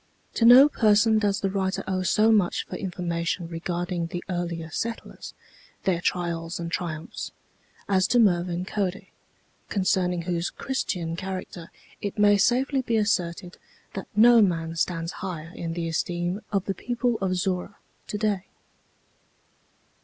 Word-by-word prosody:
To 230 - +2
no 250 +4 +10
person 220 -4 +4
does 205 -1 0
the 195 - +1
writer 190 -1 -1
owe 190 -1 0
so 215 +5 +3
much 200 -5 +2
for - - -7
information 170 -2 -3
regarding 175 +1 -3
the 175 +1 -5
earlier 170 -2 -3
settlers, 230 +7 -5 0.5
their 175 -3 +1
trials 170 -1 -2
and 170 -1 -4
triumphs, 165 -3 -4 0.6
as 190 -2 +3
to 245 - +2
Mervin 180 -4 +2
Cody, 195 -1 -3 0.6
concerning 180 -3 +1
whose 175 0 -1
Christian 180 -11 -3
character 185 -2 -6 0.3
it 205 +1 -4
may 205 0 +5
safely 255 +6 +2
be 235 -3 0
asserted 180 -4 -1 0.3
that 195 - -6
no 230 +2 +7
man 165 -4 0
stands 165 0 -1
higher 170 -4 -5
in 165 -1 -4
the 165 0 -3
esteem 175 +4 -2
of 195 -2 0
the 195 - -1
people 240 +3 -1
of 185 -1 0
Zorra 185 +2 -2 0.3
to 210 - -3
day. 205 -3 -1
185 Hz, 140 wpm, -26 LUFS, 170-205 Hz, 0.6 s, no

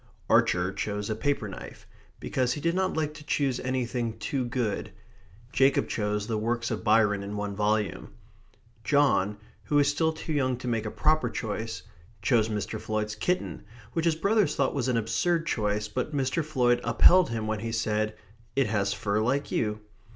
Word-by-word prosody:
Archer 90 +1 +3
chose 105 +1 -3
a - - 0
paper 140 -1 -1
knife, 95 - -9 0.3
because 125 -1 0
he - - -5
did 170 +3 +1
not 190 -1 0
like 150 -1 -1
to 155 -1 -11
choose 135 -4 0
anything 125 -3 -2
too 135 -2 -2
good; 120 -3 -2 0.6
Jacob 135 +1 +3
chose 105 -1 -1
the 110 -1 -1
works 120 +2 -1
of 110 - -3
Byron 105 -2 +3
in 100 +1 -5
one 105 -1 -3
volume; 105 -2 0 0.7
John, 135 -9 +3 0.3
who 150 - -1
was 145 -1 +5
still 160 +2 +1
too 160 0 -5
young 130 -4 +1
to 125 - -7
make 115 -2 -1
a - - -1
proper 155 +7 +2
choice, 110 0 -4 0.4
chose 110 0 +2
Mr. 105 -2 -3
Floyd's 110 0 -2
kitten, 180 +12 -2 0.3
which 165 - 0
his 165 -2 +3
brothers 200 -2 +2
thought 135 -2 +1
an 125 -2 +2
absurd 115 +10 +1
choice, 105 -7 0
but 130 +7 -3
Mr. 135 +4 0
Floyd 125 -5 +2
upheld 180 -2 +6
him 115 -2 -2
when 110 -1 -1
he 115 +2 -4
said: 110 -1 0 0.4
"It 135 -1 +3
has 100 -2 0
fur 105 0 -1
like 130 +5 0
you." 105 -1 -1
115 Hz, 175 wpm, -28 LUFS, 105-145 Hz, 0.7 s, upheld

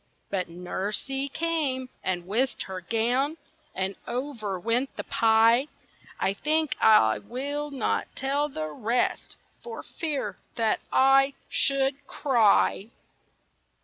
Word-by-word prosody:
But 185 -2 -1
Nursie 205 +10 -3
came, 300 -6 -1 0.2
and 180 -2 -2
whisked 235 +8 0
her 190 -1 -6
gown, 245 - 0 0.4
And 190 +1 -2
over 235 -7 -3
went 235 +7 0
the - - -4
pie. 230 +3 +4 0.5
I 195 - +1
think 305 +4 +1
I 110 - +6
will 285 +4 -4
not 270 -5 -1
tell 280 +2 0
the 155 - -4
rest, 230 +10 -1 0.3
For 465 -1 -7
fear—that—I 270 - +1
should—cry! 270 -6 +2
250 Hz, 100 wpm, -27 LUFS, 205-275 Hz, 0.5 s, I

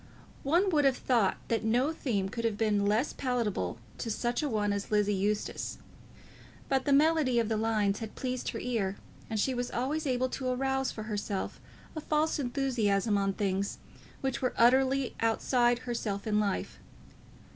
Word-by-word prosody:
One 345 +8 +2
would 300 -3 +3
have 270 -2 +3
thought 235 -6 +2
that 225 -1 0
no 245 +7 +2
theme 210 -11 -1
could 230 +4 -5
have 225 -3 0
been 205 -2 +2
less 220 +7 +1
palatable 225 - -1 0.2
to 230 - -3
such 240 +4 -1
a 295 - -1
one 205 -3 +1
as 200 0 -3
Lizzie 210 -1 +2
Eustace; 205 +2 -1 0.9
but 270 -1 +1
the 285 - +1
melody 295 -3 +4
of 230 -2 +2
the 220 - +1
lines 215 -2 +1
had 220 -2 -7
pleased 255 -1 -3
her - - -4
ear, 210 -6 -1 0.3
and 220 -2 -1
she 260 +5 +1
was 245 0 -2
always 290 +5 -1
able 255 0 +1
to 260 0 -4
arouse 265 +1 0
for 215 - -6
herself 205 -2 -3 0.3
a 310 - -3
false 305 +1 +1
enthusiasm 240 -6 +1
on 195 -1 +1
things 195 0 -1 0.4
which 265 -2 -2
were 255 - 0
utterly 260 +2 +4
outside 240 +2 +2
herself 215 -5 -3
in 210 -1 +2
life. 200 -2 -2
235 Hz, 170 wpm, -30 LUFS, 210-265 Hz, 0.9 s, melody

